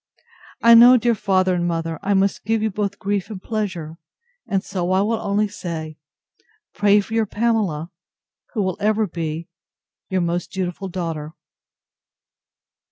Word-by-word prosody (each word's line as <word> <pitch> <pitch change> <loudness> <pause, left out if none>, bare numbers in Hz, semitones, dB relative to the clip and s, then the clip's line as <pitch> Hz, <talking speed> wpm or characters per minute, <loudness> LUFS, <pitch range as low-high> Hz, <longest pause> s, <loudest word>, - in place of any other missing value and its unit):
I 235 0 +8
know, 240 +2 +9
dear 240 0 +2
father 190 -3 +1
and 175 -1 0
mother, 165 -2 -2
I 200 +1 +1
must 195 +1 +1
give 220 +1 0
you 220 - 0
both 200 0 -2
grief 200 -1 -2
and 210 -4 -6
pleasure; 185 -7 -4 0.5
and 195 -1 0
so 180 -4 -3
I 190 - +3
will 220 +2 0
only 205 +1 0
say, 165 -6 -6 0.7
Pray 205 0 +4
for 220 - -9
your 225 -1 +1
Pamela; 205 -8 -1 0.6
who 210 - +1
will 185 -2 -2
ever 215 +1 +2
be 165 -2 -4 0.6
Your 190 -1 0
most 175 +1 -2
dutiful 190 0 -3
DAUGHTER. 165 -4 -4
195 Hz, 150 wpm, -21 LUFS, 175-210 Hz, 0.7 s, know